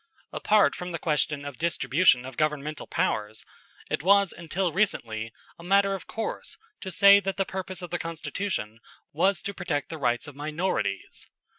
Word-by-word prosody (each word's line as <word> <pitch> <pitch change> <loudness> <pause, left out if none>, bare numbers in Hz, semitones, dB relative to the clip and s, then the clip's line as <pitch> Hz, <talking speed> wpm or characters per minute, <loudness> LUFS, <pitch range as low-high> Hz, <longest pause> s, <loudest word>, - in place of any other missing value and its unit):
Apart 210 -1 +4
from 180 0 -6
the 170 - -2
question 150 -2 0
of 140 -2 -7
distribution 150 -4 +3
of 130 -1 -8
governmental 150 0 -2
powers, 110 - -1 0.4
it - - -1
was 200 +2 +4
until 175 +2 -2
recently 115 - -1 0.3
a - - -11
matter 195 +2 +3
of 195 - -6
course 225 - -4 0.2
to 190 - -6
say 200 +1 +7
that 195 -1 -3
the 195 - +1
purpose 190 -1 -5
of 175 - -7
the 175 - -1
Constitution 165 - -4 0.3
was 175 +4 +2
to 200 - -3
protect 145 -7 -2
the 160 - -6
rights 120 +1 0
of 145 - -10
minorities. 150 - -2
170 Hz, 165 wpm, -27 LUFS, 145-190 Hz, 0.4 s, say